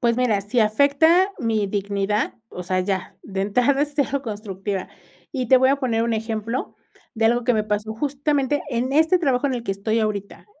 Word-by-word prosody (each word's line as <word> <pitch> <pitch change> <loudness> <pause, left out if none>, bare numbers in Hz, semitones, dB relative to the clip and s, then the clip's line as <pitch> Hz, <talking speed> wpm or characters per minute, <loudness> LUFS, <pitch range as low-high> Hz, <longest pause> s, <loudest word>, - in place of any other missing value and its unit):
Pues 235 -1 +2
mira, 230 -5 +2
si 225 +4 0
afecta 285 - +4
mi 225 -6 0
dignidad, 200 +1 -1 0.2
o 180 - -7
sea, 185 +1 0
ya. 190 -1 -3
De 195 -1 -4
entrada, 250 +8 +2
es 295 0 -3
cero 280 -1 0
constructiva. 200 -3 -4 0.4
Y 255 -5 -2
te 260 - +7
voy 260 +1 +4
a 275 - +3
poner 235 -5 0
un 230 0 0
ejemplo, 225 +2 -3 0.4
de 225 -1 0
algo 240 +1 +2
que 245 - +3
me 215 - 0
pasó, 210 +1 -2
justamente, 285 +2 0
en 255 +1 -1
este 320 +5 +4
trabajo, 275 -4 +1
en 265 - -1
el 240 - -4
que 195 - -1
estoy 215 +3 -1
ahorita. 205 -2 -4
230 Hz, 200 wpm, -22 LUFS, 210-270 Hz, 0.4 s, te